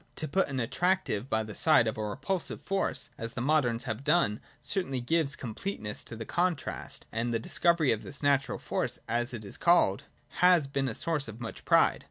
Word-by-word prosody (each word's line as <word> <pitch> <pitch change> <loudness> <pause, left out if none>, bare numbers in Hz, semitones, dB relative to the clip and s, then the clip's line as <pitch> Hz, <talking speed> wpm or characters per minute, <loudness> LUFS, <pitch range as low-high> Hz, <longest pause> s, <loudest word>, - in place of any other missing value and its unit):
— - - -38
To 155 - -3
put 190 +6 +1
an 135 -2 -3
attractive 135 - 0
by 110 0 +1
the 110 -1 -7
side 115 - +5
of 110 - -1
a 110 - -3
repulsive 145 - -3
force, 195 0 -2
as 115 0 -4
the - - -4
moderns 130 -4 +2
have 120 0 -4
done, 110 -11 +2 0.2
certainly 135 -9 -2
gives 145 +3 0
completeness 115 - -4
to - - -8
the 115 0 -6
contrast: 175 -1 -2
and 115 +2 -1
the 115 - +1
discovery 165 +5 +2
of 110 - 0
this 145 - -7
natural 140 -1 +2
force, - - -1
as 120 +2 0
it 110 -4 -7
is 100 - -8
called, 170 - +3 0.3
has 180 -4 +6
been 135 -1 -1
a 115 - -3
source 155 -6 -1
of 115 0 -8
much 115 -2 -7
pride. - - +4
135 Hz, 205 wpm, -29 LUFS, 115-165 Hz, 0.3 s, has